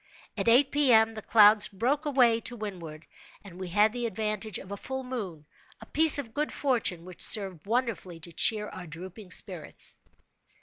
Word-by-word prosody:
At -, -, -3 dB
eight 260 Hz, +4 st, +4 dB
P. 290 Hz, -3 st, +2 dB
M., 220 Hz, 0 st, +4 dB
the 215 Hz, -, -8 dB
clouds 210 Hz, -1 st, +5 dB
broke 255 Hz, +10 st, -2 dB
away 245 Hz, -5 st, +3 dB
to 245 Hz, -, -6 dB
windward, 175 Hz, -8 st, -8 dB, 0.4 s
and 185 Hz, -3 st, -13 dB
we 185 Hz, -, -6 dB
had 210 Hz, +4 st, +2 dB
the 240 Hz, -1 st, -3 dB
advantage 215 Hz, -1 st, -3 dB
of 190 Hz, -, -12 dB
a -, -, -4 dB
full 265 Hz, +5 st, -6 dB
moon—a 195 Hz, -12 st, -10 dB
piece 320 Hz, -2 st, +5 dB
of 240 Hz, -6 st, -6 dB
good 300 Hz, +1 st, -2 dB
fortune 230 Hz, -, -2 dB
which 185 Hz, -2 st, -11 dB
served 195 Hz, -4 st, +2 dB
wonderfully 215 Hz, -8 st, -3 dB
to 170 Hz, -, -9 dB
cheer 210 Hz, +4 st, +2 dB
our 180 Hz, -2 st, -10 dB
drooping 185 Hz, +5 st, -10 dB
spirits. -, -, -2 dB
215 Hz, 175 wpm, -27 LUFS, 185-245 Hz, 0.4 s, clouds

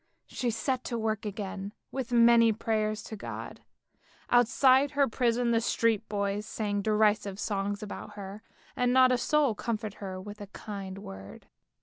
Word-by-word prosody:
She 245 Hz, -, -2 dB
set 250 Hz, +3 st, -1 dB
to 235 Hz, -, -2 dB
work 220 Hz, -1 st, -1 dB
again 200 Hz, 0 st, -5 dB, 0.2 s
with 260 Hz, -3 st, -4 dB
many 235 Hz, -1 st, +6 dB
prayers 215 Hz, -1 st, -1 dB
to 220 Hz, -, -7 dB
God. 205 Hz, -, -7 dB, 0.7 s
Outside 255 Hz, +3 st, +5 dB
her 280 Hz, 0 st, +2 dB
prison 235 Hz, +1 st, +1 dB
the 230 Hz, -1 st, +3 dB
street 230 Hz, -2 st, +1 dB
boys 200 Hz, 0 st, -1 dB
sang 205 Hz, -3 st, -2 dB
derisive 210 Hz, -2 st, +2 dB
songs 200 Hz, 0 st, -2 dB
about 210 Hz, -, -7 dB
her, 200 Hz, +1 st, -8 dB, 0.3 s
and 250 Hz, 0 st, +2 dB
not 255 Hz, 0 st, +6 dB
a 250 Hz, -, +3 dB
soul 295 Hz, -1 st, +2 dB
comforted 215 Hz, -1 st, -4 dB
her 190 Hz, -2 st, -5 dB
with 205 Hz, +2 st, -9 dB
a 205 Hz, -, -7 dB
kind 195 Hz, -2 st, -7 dB
word. 95 Hz, -, -10 dB
215 Hz, 155 wpm, -29 LUFS, 205-235 Hz, 0.7 s, many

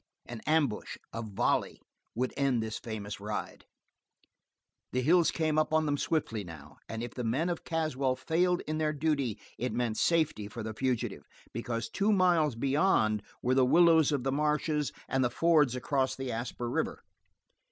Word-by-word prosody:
An 120 Hz, -2 st, -8 dB
ambush, 155 Hz, -8 st, +1 dB, 0.2 s
a 115 Hz, -, -3 dB
volley, 105 Hz, -4 st, 0 dB, 0.4 s
would 125 Hz, +2 st, -1 dB
end 135 Hz, -5 st, +1 dB
this 110 Hz, 0 st, -4 dB
famous 105 Hz, -3 st, -6 dB
ride. 105 Hz, +1 st, -5 dB, 1.3 s
The 125 Hz, 0 st, +1 dB
hills 170 Hz, +4 st, +5 dB
came 155 Hz, -2 st, +1 dB
up 155 Hz, -, +1 dB
on 155 Hz, 0 st, +3 dB
them 145 Hz, -1 st, +1 dB
swiftly, 115 Hz, -10 st, -1 dB
now, 75 Hz, -4 st, -11 dB
and 115 Hz, +1 st, -4 dB
if 120 Hz, -, -6 dB
the 125 Hz, -, -4 dB
men 135 Hz, +10 st, 0 dB
of 175 Hz, -, -3 dB
Caswell 145 Hz, -6 st, 0 dB
failed 175 Hz, +6 st, +1 dB
in 155 Hz, 0 st, -3 dB
their 155 Hz, -1 st, +1 dB
duty 140 Hz, -6 st, 0 dB, 0.2 s
it 125 Hz, -, -2 dB
meant 120 Hz, -3 st, -1 dB
safety 155 Hz, -11 st, +1 dB
for 110 Hz, +2 st, -7 dB
the 110 Hz, 0 st, -4 dB
fugitive, 125 Hz, +1 st, -2 dB, 0.3 s
because 115 Hz, 0 st, -3 dB
two 205 Hz, +2 st, +1 dB
miles 175 Hz, -, +3 dB
beyond 135 Hz, -, +2 dB, 0.2 s
were 125 Hz, -, +2 dB
the 130 Hz, 0 st, +4 dB
willows 160 Hz, +2 st, +5 dB
of 140 Hz, -4 st, 0 dB
the 135 Hz, -, 0 dB
marshes 150 Hz, +1 st, 0 dB, 0.2 s
and 135 Hz, 0 st, +1 dB
the 125 Hz, -, +2 dB
fords 150 Hz, -4 st, +3 dB
across 130 Hz, +1 st, 0 dB
the 135 Hz, -1 st, -4 dB
Asper 120 Hz, +1 st, -4 dB
River. 120 Hz, -, -2 dB
135 Hz, 170 wpm, -30 LUFS, 115-155 Hz, 1.3 s, hills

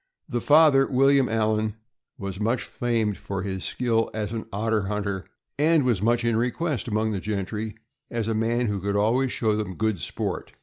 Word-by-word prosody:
The 120 Hz, -1 st, -2 dB
father, 145 Hz, -2 st, +6 dB
William 135 Hz, 0 st, +4 dB
Allan, 110 Hz, -1 st, 0 dB, 0.4 s
was 100 Hz, -1 st, -5 dB
much 115 Hz, +4 st, 0 dB
famed 115 Hz, -4 st, -1 dB
for 100 Hz, -2 st, -4 dB
his 95 Hz, -1 st, -4 dB
skill 115 Hz, -2 st, 0 dB
as 105 Hz, -1 st, -2 dB
an 115 Hz, -1 st, -4 dB
otter 105 Hz, 0 st, 0 dB
hunter, 100 Hz, -2 st, -2 dB, 0.3 s
and 155 Hz, 0 st, +4 dB
was 120 Hz, -7 st, +1 dB
much 120 Hz, +2 st, +2 dB
in 115 Hz, -1 st, +2 dB
request 125 Hz, +4 st, -1 dB
among 110 Hz, 0 st, 0 dB
the 100 Hz, -, -2 dB
gentry 105 Hz, +2 st, -3 dB, 0.3 s
as 115 Hz, -2 st, -2 dB
a 115 Hz, -, +1 dB
man 115 Hz, +2 st, +1 dB
who 100 Hz, -3 st, -2 dB
could 100 Hz, +1 st, -1 dB
always 120 Hz, +6 st, +2 dB
show 110 Hz, -2 st, +1 dB
them 105 Hz, -4 st, -3 dB
good 110 Hz, -2 st, 0 dB
sport. -, -, -4 dB
110 Hz, 180 wpm, -25 LUFS, 105-120 Hz, 0.4 s, father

